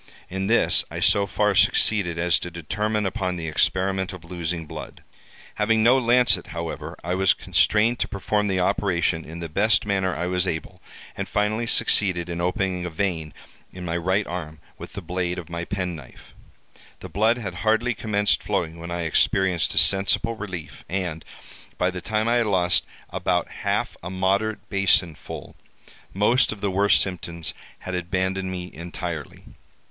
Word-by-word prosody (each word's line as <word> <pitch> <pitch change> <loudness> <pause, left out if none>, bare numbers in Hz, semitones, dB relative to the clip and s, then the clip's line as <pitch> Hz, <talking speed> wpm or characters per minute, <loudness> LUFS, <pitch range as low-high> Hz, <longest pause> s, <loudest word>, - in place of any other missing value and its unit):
In 95 +1 -2
this 115 +2 +4
I - - -5
so 100 -1 +4
far 105 +1 +1
succeeded 100 -3 +3
as 85 0 +2
to 90 - -5
determine 105 +6 -2
upon 95 -1 -1
the 85 -2 -4
experiment 95 +4 0
of 90 -2 -10
losing 85 -1 -3
blood. - - -9 0.6
Having 110 +1 +3
no 125 +3 +6
lancet, 125 0 +4
however, 85 -1 -5
I 90 +2 -1
was 95 0 +3
constrained 110 +3 +2
to - - 0
perform 105 +1 -1
the 95 -2 0
operation 90 -3 +1
in 85 +2 -8
the 85 - -3
best 105 +8 +2
manner 95 -3 0
I 90 - -2
was 90 +1 0
able, 80 -2 -4 0.3
and - - -4
finally 110 +3 0
succeeded 90 -6 +2
in 85 0 -3
opening 90 0 -1
a 90 - -3
vein 80 -3 -2 0.4
in 90 -1 -8
my 85 -1 -2
right 95 +4 +1
arm, 80 -3 -6 0.2
with - - -9
the 100 - -6
blade 90 +1 -2
of 85 -1 -8
my 85 0 -3
penknife. 90 -9 -6 0.7
The - - -7
blood 110 +4 +2
had 100 -7 -5
hardly 110 +3 +2
commenced 105 -1 +1
flowing 80 0 -2
when 85 +1 -7
I 85 0 -2
experienced 85 +1 +2
a - - -3
sensible 100 +4 +4
relief, 95 -8 -7
and 90 -4 -3 0.5
by 90 +1 +1
the 90 0 -6
time 110 +2 -1
I 120 +1 +3
had 115 -2 +2
lost 90 -3 +2 0.3
about - - 0
half - - -2
a 90 - -6
moderate 100 +4 0
basin 95 -4 +3
full, - - -9 0.6
most 110 +6 +3
of 110 - -6
the 100 -1 -1
worst 100 +2 +4
symptoms 85 -3 -4 0.3
had 95 - -6
abandoned 95 +2 -1
me 90 -1 -5
entirely. 85 -1 -6
95 Hz, 170 wpm, -24 LUFS, 85-105 Hz, 0.7 s, no